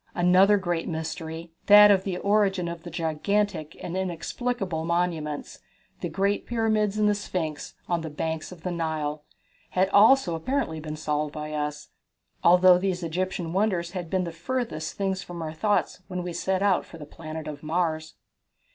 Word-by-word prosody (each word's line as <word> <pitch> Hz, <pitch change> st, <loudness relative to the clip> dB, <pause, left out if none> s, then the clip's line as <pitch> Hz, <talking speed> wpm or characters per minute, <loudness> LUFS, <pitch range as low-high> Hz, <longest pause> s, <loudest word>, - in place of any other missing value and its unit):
Another 185 Hz, +3 st, +5 dB
great 175 Hz, -3 st, -2 dB
mystery 160 Hz, 0 st, -5 dB, 0.2 s
that 210 Hz, 0 st, +9 dB
of 190 Hz, -2 st, +3 dB
the 190 Hz, -2 st, -3 dB
origin 200 Hz, -3 st, +2 dB
of 170 Hz, -1 st, -5 dB
those -, -, -9 dB
gigantic 165 Hz, +1 st, -1 dB
and 175 Hz, -, -4 dB
inexplicable 190 Hz, 0 st, -2 dB
monuments, 165 Hz, -3 st, -2 dB, 0.4 s
the -, -, -3 dB
great 200 Hz, +1 st, 0 dB
pyramids 215 Hz, -3 st, +1 dB
and 210 Hz, -1 st, +3 dB
the 210 Hz, -, +4 dB
Sphinx, 170 Hz, -7 st, -4 dB
on 170 Hz, -1 st, 0 dB
the 160 Hz, -, -5 dB
banks 160 Hz, +2 st, -3 dB
of 170 Hz, -3 st, -12 dB
the 180 Hz, -, -2 dB
Nile, 155 Hz, -3 st, -2 dB, 0.5 s
had 190 Hz, +1 st, +2 dB
also 210 Hz, -1 st, +5 dB
apparently 165 Hz, -, -1 dB
been 155 Hz, 0 st, -6 dB
solved 150 Hz, -1 st, -1 dB
by 150 Hz, 0 st, -5 dB
us, 150 Hz, 0 st, -3 dB, 0.5 s
although 180 Hz, +1 st, +7 dB
these 185 Hz, -2 st, -1 dB
Egyptian 175 Hz, 0 st, -2 dB
wonders 185 Hz, -4 st, 0 dB
had 175 Hz, -3 st, -5 dB
been 185 Hz, +1 st, +1 dB
the 170 Hz, -, -4 dB
furthest 175 Hz, 0 st, -3 dB
things 190 Hz, -1 st, -1 dB
from 175 Hz, -1 st, -8 dB
our 160 Hz, -1 st, -4 dB
thoughts 205 Hz, +2 st, 0 dB
when 180 Hz, -1 st, -4 dB
we 175 Hz, -1 st, -4 dB
set 190 Hz, +2 st, 0 dB
out 195 Hz, -3 st, +3 dB
for 165 Hz, -, -12 dB
the 150 Hz, -, -9 dB
planet 155 Hz, -1 st, -7 dB
Mars. 160 Hz, -1 st, -1 dB
175 Hz, 165 wpm, -26 LUFS, 160-195 Hz, 0.5 s, that